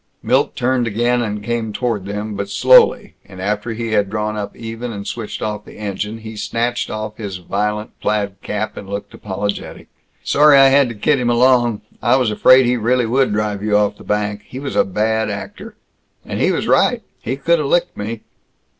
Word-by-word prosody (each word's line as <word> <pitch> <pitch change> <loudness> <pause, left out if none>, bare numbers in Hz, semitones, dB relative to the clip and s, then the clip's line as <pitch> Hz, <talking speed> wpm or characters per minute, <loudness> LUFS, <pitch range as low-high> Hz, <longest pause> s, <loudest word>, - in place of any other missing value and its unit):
Milt - - +1
turned 125 -1 +1
again 120 +3 +1
and 105 -2 -3
came 115 0 -2
toward 105 -3 -2
them, 105 +1 -4
but 100 0 -4
slowly; 255 - +5
and 95 -2 -13
after 105 +4 -2
he 115 0 -4
had 100 -2 +2
drawn 105 0 -2
up 100 -1 -5
even 115 +1 -6
and 100 -2 -7
switched 115 -3 -5
off 105 -1 -3
the - - -14
engine, 105 +1 -4
he 110 0 -9
snatched 120 +3 -2
off 110 0 -5
his 100 -4 -5
violent 105 +4 -2
plaid 100 -2 -2
cap 105 +1 -3
and 100 - -8
looked 100 0 -6
apologetic. 100 0 -5 0.3
"Sorry 150 0 +5
I 135 0 +7
had 135 -1 +4
to 115 - -7
kid 140 +7 +1
him 120 -1 0
along. 120 -2 +3 0.2
I 120 +1 +3
was 125 -5 +2
afraid 130 +4 +6
he 125 +1 +2
really 120 +2 +1
would 130 +2 +2
drive 105 -1 -1
you 105 0 +2
off 105 -1 +1
the - - -12
bank. 105 0 -1
He 125 - -9
was 135 +1 -5
a - - +5
bad 110 +3 0
actor. - - -7 0.5
And - - -4
he - - +3
was - - -1
right; - - +3 0.2
he 125 - -3
could 170 +4 +2
have 150 - -1
licked 175 +4 +1
me. 110 +2 -5
110 Hz, 200 wpm, -18 LUFS, 105-120 Hz, 0.5 s, I